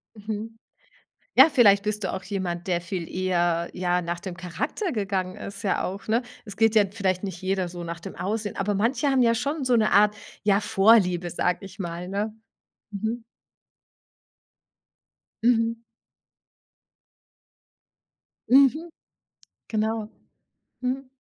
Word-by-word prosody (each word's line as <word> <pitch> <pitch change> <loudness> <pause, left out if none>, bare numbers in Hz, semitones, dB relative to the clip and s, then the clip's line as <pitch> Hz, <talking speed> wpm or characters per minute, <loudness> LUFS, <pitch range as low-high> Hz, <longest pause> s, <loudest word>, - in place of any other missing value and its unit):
Mhm, 215 +2 -6 0.8
ja, - - +9
vielleicht 205 -8 +5
bist 210 -1 -2
du - - -1
auch 190 - -5
jemand, 185 -3 -4
der 175 -2 0
viel 170 -1 -5
eher, 175 -2 +1
ja, 180 0 0
nach 170 0 -4
dem 185 -2 -7
Charakter 180 - -3
gegangen 195 -4 -2
ist 200 +2 -8
ja 195 - 0
auch, 195 +3 -6
ne? 230 +3 +2 0.2
Es 200 -1 -8
geht 225 0 +3
ja 210 -2 +6
vielleicht 195 -3 -1
nicht 190 -2 -6
jeder 190 -1 0
so 175 0 -7
nach 170 0 -6
dem - - -9
Aussehen, 210 +2 -3
aber 200 +1 0
manche 240 +8 +1
haben 265 -2 +3
ja 230 -1 +4
schon 280 +5 -2
so 250 -2 +3
'ne 215 -1 +2
Art, 210 +1 +5 0.3
ja, 200 0 +4
Vorliebe, 195 -4 +4
sage 180 +1 0
ich 195 +2 -13
mal, 175 -1 -5
ne? 205 +3 -2 0.6
Mhm. 220 +4 -3 2.2
Mhm. 230 -1 +3 2.7
Mhm. 280 +6 +5 0.8
Genau. 220 0 -1 0.7
Hm. 260 +1 -2
200 Hz, 135 wpm, -25 LUFS, 180-225 Hz, 2.7 s, ja